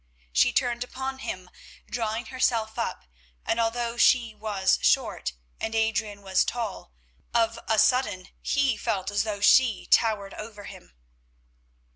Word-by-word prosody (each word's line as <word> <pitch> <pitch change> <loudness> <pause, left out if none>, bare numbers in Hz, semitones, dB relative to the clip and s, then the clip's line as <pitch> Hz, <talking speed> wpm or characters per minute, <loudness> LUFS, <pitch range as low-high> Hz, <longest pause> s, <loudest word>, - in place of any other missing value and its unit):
She - - +4
turned 245 -2 0
upon 265 +1 -5
him, 185 -7 -5 0.4
drawing 225 0 -2
herself 230 -4 0
up, - - -3 0.4
and 230 - 0
although 235 +1 -1
she 235 -2 +4
was 210 -3 0
short - - +1 0.3
and 220 0 -3
Adrian 220 -2 -1
was 190 -1 +2
tall, 225 - -4 0.4
of 230 0 +2
a 220 - +2
sudden 205 -8 +2
he 275 -5 +1
felt 190 -2 -2
as 205 - +1
though 210 -2 -3
she 235 0 +5
towered 210 -3 +2
over 215 -1 -9
him. 60 - -12
220 Hz, 135 wpm, -26 LUFS, 205-240 Hz, 0.4 s, she